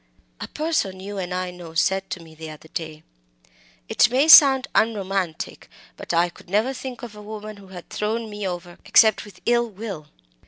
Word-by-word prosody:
"A - - -5
person 300 - -2
you 200 +1 -6
and 180 -1 -4
I 180 0 -2
know 175 -2 -11
said 190 +3 +1
to 190 - -4
me 165 -1 -14
the 160 0 -9
other 155 +1 -12
day, 155 -1 -6 0.8
'It - - +4
may 265 +5 +2
sound 275 -5 +9
unromantic, 195 -6 -1 0.3
but - - -6
I 170 +1 +3
could 175 - -18
never 215 +7 +1
think 255 -1 -8
of 230 -3 -8
a 210 - -10
woman 215 0 -8
who 200 -1 -15
had 180 -2 -11
thrown 225 +2 -2
me 210 -2 -5
over 175 -1 -7
except 220 -2 +4
_with 190 -3 -15
ill 240 0 +2
will. 195 -7 -7
195 Hz, 190 wpm, -23 LUFS, 175-225 Hz, 0.8 s, sound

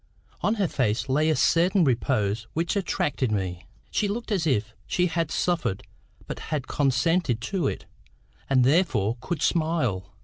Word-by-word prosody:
On 210 - +1
her 200 -4 +1
face 125 -3 -1
lay 150 +4 +2
a 155 - +3
certain 180 +5 +3
repose 110 -5 0
which 165 +4 -1
attracted 145 - 0
me. 90 -3 -3 0.2
She 210 - +1
looked 230 +3 -4
as 180 -6 +1
if 115 -5 0
she 180 - +1
had 165 -2 -1
suffered 155 - -1 0.4
but - - -6
had 150 -5 -2
consented 140 0 +1
to 185 +8 -1
it, - - -4 0.6
and 130 -2 +4
therefore 130 - +2
could 175 +4 -3
smile. 130 - 0
150 Hz, 150 wpm, -26 LUFS, 115-175 Hz, 0.6 s, and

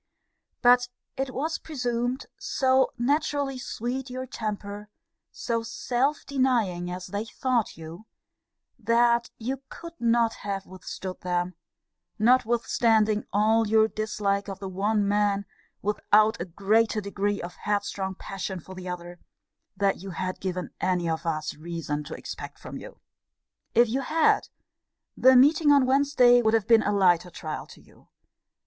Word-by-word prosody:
But 245 0 +6 0.3
it 270 0 -2
was 315 +5 -2
presumed, 245 -3 -2
so 260 0 +2
naturally 280 +1 0
sweet 250 +2 -4
your 255 +1 -5
temper, 210 -3 -5 0.4
so 230 -1 -2
self 250 +5 -1
denying 235 -10 0
as 180 0 -5
they 205 +3 -3
thought 240 0 -1
you, 165 +6 -10 0.7
that 235 +1 +3
you 260 +4 -4
could 335 0 -9
not 230 -1 +2
have 195 -1 -4
withstood 185 0 -8
them, 180 0 -1 0.6
notwithstanding 225 -2 +2
all 220 +2 +3
your 220 +1 +4
dislike 210 -2 -1
of 195 -1 -5
the 195 0 -6
one 200 +2 0
man, 205 -1 +1 0.4
without 215 +1 +3
a - - -2
greater 215 +5 +1
degree 200 0 -2
of 175 +1 -6
headstrong 200 -2 -2
passion 190 -1 -5
for 190 +3 -11
the 185 -1 -7
other, 175 0 -7 0.6
than 200 -1 +1
you 195 +2 -8
had 185 +1 -4
given 185 -1 -4
any 180 -2 0
of 165 +1 -2
us 155 -1 -2
reason 155 -2 -4
to - - -6
expect - - -8
from - - -9
you. - - -10 0.8
If 240 +1 +6
you 255 +5 -1
had, 315 +4 +2 0.7
the 260 0 +6
meeting 290 +4 +6
on 280 -2 +5
Wednesday 260 -2 +5
would 220 -1 +3
have 220 -3 +1
been 230 -1 +6
a 205 - 0
lighter 180 -3 +3
trial 155 -2 -6
to - - -14
you. - - -22
215 Hz, 140 wpm, -26 LUFS, 190-245 Hz, 0.8 s, But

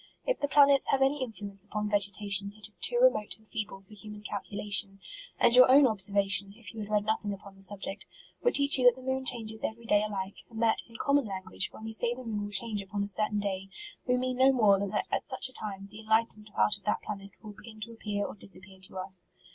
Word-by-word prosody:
If - - 0
the 285 - 0
plan 285 -1 +6
ets 275 -1 +2
have 270 -1 +2
any 275 +1 +1
influence 205 -5 -5
upon 210 0 -4
vegetation, 200 0 +1
it 215 - -5
is 215 - 0
too 485 - 0
remote - - +3
and 220 0 -25
feeble 215 -4 -5
for 195 +2 -19
human 210 0 -11
calculation; 200 -1 -1 0.4
and 235 - +6
your 255 0 +8
own 275 +2 +7
observation, 200 -2 +3
if 225 -4 -10
you 225 - -9
had 210 -1 -6
read 210 -1 +1
nothing 215 -1 -1
upon 200 0 -11
the 195 - -17
subject, 195 +1 -2 0.3
would 485 - +2
teach 280 -1 +5
you 250 - +1
that 245 - +7
the 260 - -13
moon 265 0 -1
changes 220 -3 +1
every 230 +1 -5
day 210 -2 +3
alike, 200 -2 -5
and 225 -2 -9
that, 225 - +2
in 230 - -17
common 280 +3 +1
language, 185 - -2
when - - -12
we 220 0 -6
say 235 +2 0
the 255 - -9
moon 210 -3 -4
will 205 - -8
change 210 +1 0
upon 200 +1 -4
a - - -4
certain 210 +1 +2
day, 195 -1 -3 0.4
we 250 0 +2
mean 255 0 -2
no 265 +1 +5
more 210 -6 +4
than 200 0 -2
that 210 - -2
at - - 0
such 260 -2 -3
a - - -16
time, 195 -4 -7
the 210 +2 -13
enlightend 220 -1 -1
part 210 - +2
of 200 - -21
that 210 - -1
planet 195 -1 -7
will 215 -1 -9
begin 215 +2 -13
to 230 +2 -6
appear 210 -3 -4
or - - -6
disappear 190 -1 -7
to 190 0 -3
us. 185 -1 -2
210 Hz, 245 wpm, -29 LUFS, 200-235 Hz, 0.4 s, your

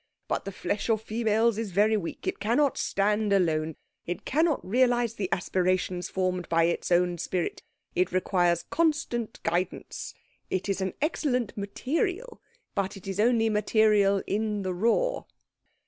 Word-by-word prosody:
But - - -2
the 195 - -4
flesh 205 +3 -3
of 220 -1 +3
females 225 0 +1
is 225 -2 -3
very 210 +4 +3
weak. 185 -6 -4
It 375 - -2
cannot 250 +6 +2
stand 210 +1 +1
alone. 160 -5 +1 0.3
It 175 - -4
cannot 310 - +1
realise 240 +1 +2
the 195 -5 -3
aspirations 185 -1 0
formed 185 -2 -1
by 165 0 +3
its 170 +1 0
own 175 0 +3
spirit. 180 0 -2 0.3
It 180 +1 +1
requires 175 -2 +2
constant 300 -8 -1
guidance. 175 +2 -3 0.3
It 185 - -2
is 195 -1 -1
an 190 -1 -2
excellent 255 -7 0
material, 350 - -2 0.3
but 195 0 -2
it 190 - -13
is 195 0 -4
only 225 0 +3
material 210 -2 +3
in 210 0 -1
the 185 -1 -2
raw." 235 - +1
205 Hz, 145 wpm, -27 LUFS, 185-235 Hz, 0.3 s, of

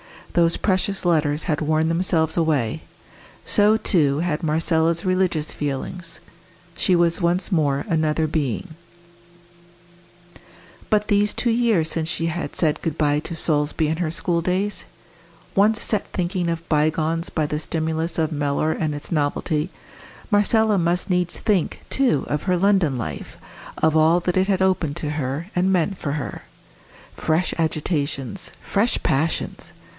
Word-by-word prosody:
Those 170 -1 +3
precious 195 0 0
letters 155 -3 +1
had 155 -3 -1
worn 155 +1 +1
themselves 165 -2 +1
away; 150 -9 0 0.6
so, 210 +1 +4
too, 150 -10 +2
had 170 -2 -1
Marcella's 165 +1 +1
religious 185 -5 0
feelings; 165 +4 -5 0.5
she 185 +1 +2
was 170 +1 +2
once 175 +3 +1
more 145 -5 +1
another 155 -1 +1
being. 150 - -2 2.2
But 210 -1 +1
these 205 0 +3
two 240 - 0
years 225 -9 +2
since 160 -1 -2
she 165 0 -1
had 170 +1 -4
said 155 -3 +1
good 160 -2 -3
bye 145 -1 +2
to 165 +2 -6
Solesby 150 -1 0
and 160 +1 -2
her 170 -3 0
school 170 +1 0
days? 185 +4 -1 0.7
Once 215 +3 +3
set 210 -3 +1
thinking 175 -1 -1
of 165 0 -4
bygones 155 +2 +1
by 155 - -1
the 150 +1 -2
stimulus 160 +1 -2
of 160 -1 0
Mellor 145 +1 0
and 155 -2 -2
its 145 - -7
novelty, 150 +1 0 0.6
Marcella 210 0 +4
must 175 +3 0
needs 180 -1 +1
think, 200 -6 0
too, 260 - +2
of 150 +1 -2
her 185 -1 +1
London 185 -7 +2
life, 115 - -6 0.4
of 160 0 +2
all 160 +3 +4
that 180 +1 -1
it 190 +1 +2
had 190 -2 +1
opened 180 -6 +1
to 150 - -3
her, 150 +2 -3
and 185 +2 +2
meant 185 +2 +1
for 140 - -3
her. 150 -2 -5 0.7
Fresh 160 +3 0
agitations! 155 0 -2
fresh 215 +4 +1
passions! 155 +4 -1
165 Hz, 145 wpm, -22 LUFS, 155-185 Hz, 2.2 s, so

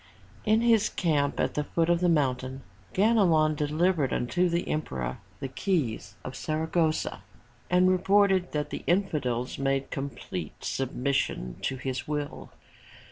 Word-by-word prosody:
In 215 +1 +4
his 230 -3 +4
camp 145 -5 0
at - - +1
the 150 - 0
foot 165 +2 0
of 175 0 +3
the 180 0 +2
mountain, 130 -4 0 0.3
Ganelon 185 -7 +4
delivered 150 0 +1
unto 175 +9 +1
the 170 +1 -1
emperor 65 - -3 0.2
the 135 - -3
keys 130 - -2
of 130 - -6
Saragossa 160 +1 0 0.5
and 180 +1 +4
reported 190 0 +3
that 150 -1 -2
the - - -5
infidels 150 -10 0
made 135 0 0
complete 115 - -5
submission 130 - -1
to 135 - -1
his 130 0 -4
will. 150 -1 -4
150 Hz, 135 wpm, -28 LUFS, 130-180 Hz, 0.5 s, In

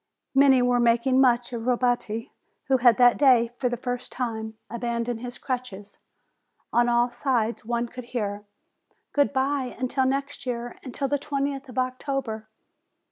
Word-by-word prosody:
Many 270 -2 +5
were 245 0 +3
making 240 +3 +3
much 245 -1 +3
of 230 0 -4
Robetti, 245 -3 0 0.4
who 265 - +5
had 240 -3 +5
that 245 -1 +5
day, 245 -5 +5
for 250 - +1
the 245 - -3
first 245 +1 -4
time, 220 -3 -4
abandoned 235 0 -3
his 245 +1 -7
crutches. 240 -6 -5 0.7
On 240 0 +4
all 240 0 +2
sides 240 -3 -1
one 235 +1 -1
could 250 +1 -9
hear: 205 -4 -3 0.7
"Good 285 -1 +3
bye 270 -1 -1
until 260 +1 0
next 275 0 -3
year! 240 -1 -4
Until 275 +1 -3
the 285 +1 0
twentieth 275 -1 -3
of 250 - -11
October 255 -3 -2
245 Hz, 150 wpm, -25 LUFS, 235-265 Hz, 0.7 s, Many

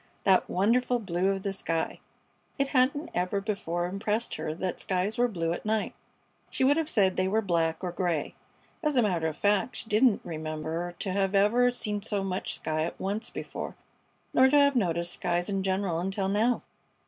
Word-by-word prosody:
That 190 -2 +4
wonderful 245 +6 +2
blue 185 -4 -1
of 195 -1 0
the 200 - -1
sky! 165 -4 -2 0.6
It 275 0 0
hadn't 280 +4 +1
ever 180 +3 0
before 195 -4 -2
impressed 210 +5 -2
her 155 0 -3
that 185 +1 -3
skies 195 +5 -1
were 245 - +4
blue 170 -7 -1
at - - -6
night. 215 0 -1 0.6
She - - -1
would 280 +2 +5
have 320 -1 0
said 190 -7 +2
they 185 - +2
were 220 +3 +1
black 165 -2 0
or 180 - -2
gray. 170 -4 -1 0.5
As 300 -3 0
a 245 - +4
matter 175 -6 +1
of 155 -1 -4
fact, 205 +4 +1
she - - -6
didn't 220 +1 +4
remember 160 +2 -4
to 190 - -3
have 195 +1 0
ever 230 +5 +4
seen 210 -4 -2
so 200 -1 -2
much 190 -1 -2
sky 155 0 -2
at 170 - -4
once 205 +4 -2
before, - - -6 0.6
nor 260 +1 +6
to 290 - +4
have 280 -1 +5
noticed 170 -5 +1
skies 175 +2 -1
in 195 -1 0
general 190 -3 0
until 190 +2 -1
now. 225 +5 +1
195 Hz, 190 wpm, -28 LUFS, 175-225 Hz, 0.6 s, nor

